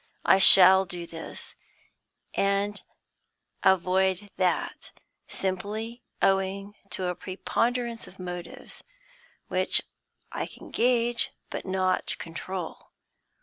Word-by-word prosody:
I 190 - +6
shall 190 0 +9
do 175 -1 -5
this, 165 -1 -7 0.8
and 200 +1 0 0.8
avoid 190 +1 +2
that, 185 -1 -1 0.3
simply 215 +5 -3 0.2
owing 195 +1 +1 0.2
to 185 - -2
a - - -1
preponderance 230 +6 -2
of 190 - -15
motives, 180 -2 -7 0.6
which - - +2 0.5
I - - -3
can - - -13
gauge, 240 -1 +2 0.2
but - - -5
not 185 0 0
control. 170 +1 -6
190 Hz, 95 wpm, -27 LUFS, 185-205 Hz, 0.8 s, shall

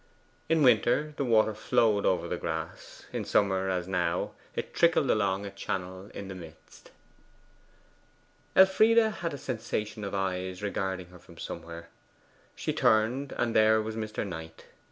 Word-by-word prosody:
In 160 -2 +3
winter, 125 +5 +3
the 140 - -1
water 110 -3 +3
flowed 110 -1 +2
over 90 - +1
the - - -2
grass; 80 +1 -6
in - - -2
summer, 95 -2 +1
as 90 -1 -1
now, 90 -3 -1 0.2
it - - -4
trickled 165 -5 +3
along 100 -2 +1
a 100 - -6
channel 95 0 -5
in 100 - -6
the 95 - -6
midst. 80 -3 -13 1.7
Elfride 205 +4 +6
had 215 -7 +2
a 145 - -5
sensation 110 -4 -4
of 100 0 -4
eyes 95 0 -2
regarding 95 -3 -3
her 90 -1 -14
from - - -17
somewhere. 85 0 -8 0.7
She - - -2
turned, 120 +6 +2
and 120 -1 -1
there 110 0 +5
was 110 0 -4
Mr. 110 -1 -3
Knight. 80 -2 -8
100 Hz, 150 wpm, -29 LUFS, 95-120 Hz, 1.7 s, Elfride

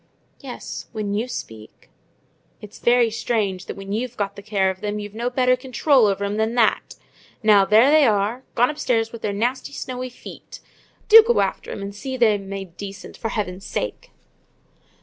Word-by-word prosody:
"Yes, 265 -4 -8
when 210 -2 -3
you 220 +4 -1
speak." 110 - -9 0.8
"And - - -29
it's 205 - -16
very 240 -1 +3
strange, 210 -4 -2
that - - -5
when 195 0 -8
you've 245 +2 -3
the 200 0 -3
care 200 -2 +1
of 190 +2 -12
'em 210 0 -2
you've 205 -1 -7
no 235 +3 -2
better 255 0 +2
control 260 -1 +2
over 200 0 -1
'em 205 +1 -2
than 220 +2 0
that!—Now, 215 -2 +1
there 225 +7 +5
they 305 -3 +6
are—gone 230 +5 0
upstairs 230 -7 -1
with 230 - -9
their 205 - -1
nasty 245 +7 -2
snowy 255 -2 -5
feet! 245 - -12 0.5
Do 450 +1 +10
go 470 +2 +1
after - - -3
'em 200 - -6
and 200 0 -6
see 260 +6 -5
them 210 -5 +2
made 195 -3 -7
decent, 200 -1 -8
for 225 - -4
heaven's 195 -3 -4
sake!" - - -4
220 Hz, 175 wpm, -22 LUFS, 200-250 Hz, 0.8 s, Do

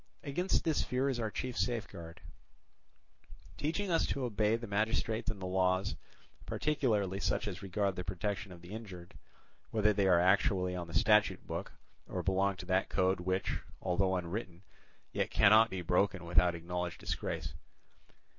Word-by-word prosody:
Against 175 +7 0
this 160 -3 +1
fear 130 +2 0
is 130 -3 -1
our 110 -2 -1
chief 125 +3 -4
safeguard, 85 -8 -3 1.3
teaching 165 - -2
us 165 - +3
to 135 - -2
obey 110 -2 +1
the 115 +1 -5
magistrates 110 +2 0
and 110 -3 -4
the 95 - -5
laws, 95 +1 +1 0.5
particularly 110 -11 0
such 100 - 0
as 90 -3 -5
regard 100 0 -1
the 90 - -4
protection 100 +2 -3
of 85 -1 -12
the 90 - -11
injured, 95 -6 -8 0.6
whether 105 -1 +3
they 100 -1 +2
are 90 -2 +5
actually 90 0 +3
on 90 -1 -4
the 80 - -8
statute 105 +6 +4
book, - - -5 0.4
or 90 - -3
belong 95 +1 +2
to 90 - -8
that 95 +1 +1
code 95 0 +2
which, 95 +1 -1 0.2
although 95 +1 +1
unwritten, 90 0 -4 0.5
yet - - -1
cannot 110 +3 +6
be 95 -3 -4
broken 90 +1 +1
without 85 0 +3
acknowledged 90 +1 -4
disgrace. - - -3
95 Hz, 155 wpm, -33 LUFS, 90-110 Hz, 1.3 s, cannot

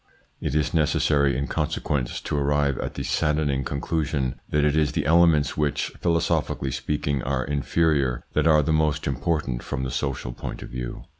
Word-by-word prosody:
It 70 - -2
is 75 -1 +1
necessary, 75 -4 +2
in 70 - -1
consequence, 65 0 -2
to - - -3
arrive 70 -1 +1
at - - -4
the - - -3
saddening 75 -3 0
conclusion 70 -1 -2
that 75 -1 +2
it 75 0 +2
is 75 -2 +2
the - - -1
elements 80 -2 +4
which, 75 -2 0
philosophically 85 -5 0
speaking, 70 -2 -1
are 65 0 -1
inferior, 70 -2 +1
that - - +2
are 75 -2 +5
the 80 - +1
most 75 -1 +1
important 70 -2 -1
from 65 - -4
the 65 - -3
social 65 -3 -3
point - - -6
of - - -9
view. 60 -1 -6
75 Hz, 170 wpm, -25 LUFS, 70-75 Hz, -, are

